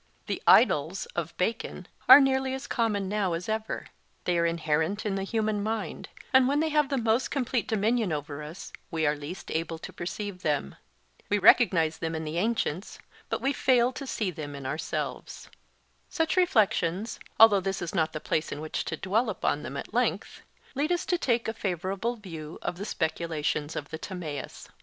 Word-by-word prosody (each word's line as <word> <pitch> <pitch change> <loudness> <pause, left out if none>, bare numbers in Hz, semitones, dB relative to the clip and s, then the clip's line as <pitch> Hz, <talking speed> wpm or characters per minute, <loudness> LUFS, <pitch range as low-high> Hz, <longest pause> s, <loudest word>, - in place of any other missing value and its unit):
The - - -3
'idols' - - +5
of - - -3
Bacon - - -2 0.2
are - - +13
nearly 265 -1 +2
as 265 +1 -6
common 215 -7 0
now 200 -3 0
as 170 +2 -4
ever; 220 0 -3 0.4
they 175 -1 +1
are 170 - +3
inherent 165 +4 0
in 205 - 0
the 195 - -1
human 215 +1 -1
mind, 220 +1 -3 0.2
and 260 -1 +6
when 285 +2 +2
they 320 +1 +1
have 300 -2 +2
the 275 - 0
most 230 +1 +1
complete 255 -4 -1
dominion 220 -2 +1
over 145 -1 -4
us, 155 +4 -9 0.2
we 160 -1 -1
are 150 0 +2
least 150 +6 -8
able 165 0 -2
to - - -9
perceive 190 +1 -5
them. 145 - -1 0.5
We 205 - +3
recognize 170 -6 +5
them 165 0 -2
in 160 - -3
the 160 +2 -2
ancients, 205 -4 -1 0.3
but - - -2
we 275 +1 +1
fail 250 -3 +3
to 275 +1 -7
see 210 -7 -1
them 145 -3 -7
in 140 -1 -8
ourselves. 150 +4 -4 0.6
Such 325 +1 0
reflections, 220 - +2 0.2
although 220 -3 +8
this 195 +1 -2
is 175 -2 -4
not 160 -1 +1
the 155 - -4
place 155 +1 -1
in - - -4
which 155 0 -3
to 160 - -3
dwell 210 +8 +1
upon - - -1
them - - -6
at - - -7
length, - - -1 0.3
lead 290 +4 0
us 350 0 0
to 355 - +1
take 235 -6 +1
a 225 - -1
favourable 195 +3 -2
view 165 -7 -8
of 175 - -3
the 200 - -4
speculations 160 -4 -2
of 145 - -5
the 160 - -5
Timaeus. 170 -7 -6
195 Hz, 190 wpm, -28 LUFS, 160-230 Hz, 0.6 s, are